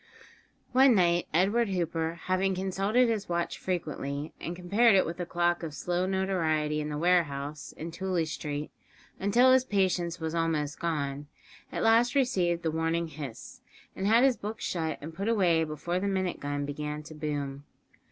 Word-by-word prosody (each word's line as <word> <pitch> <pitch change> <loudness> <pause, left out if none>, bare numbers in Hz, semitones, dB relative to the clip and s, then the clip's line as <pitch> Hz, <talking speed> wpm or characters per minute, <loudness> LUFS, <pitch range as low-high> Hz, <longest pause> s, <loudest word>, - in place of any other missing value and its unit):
One 260 -1 +6
night 175 -2 +3
Edward 200 +7 +2
Hooper, 165 -2 -2
having 185 +1 +1
consulted 195 +6 +1
his 215 -4 -2
watch 170 0 -2
frequently, 150 -5 -3
and 170 - -4
compared 200 +5 +4
it 190 - +4
with 165 - -5
the 175 -1 -4
clock 175 0 +1
of 160 -3 -6
slow 180 +4 -1
notoriety 160 -6 0
in 150 - -4
the 150 - -3
warehouse 150 -4 0
in 165 +2 -6
Tooley 185 -1 -1
Street, 150 -1 -4 0.5
until 240 +6 +4
his 260 -1 +5
patience 185 -6 0
was 160 -1 -3
almost 160 -3 -1
gone, 145 -4 -2 0.4
at - - -2
last 230 +3 +4
received 185 -11 +1
the 160 - 0
warning 165 +1 -1
hiss, 140 -6 -8 0.3
and 190 - -2
had 230 +3 +5
his 265 -3 +4
books 215 +2 -5
shut 160 -3 -2
and 160 +3 -7
put 195 +5 -4
away 175 -7 +3
before 160 +3 -3
the 200 - -1
minute 185 -2 -1
gun 145 0 -3
began 150 +1 -4
to 155 - -10
boom. 145 -2 -4
170 Hz, 170 wpm, -29 LUFS, 155-195 Hz, 0.5 s, One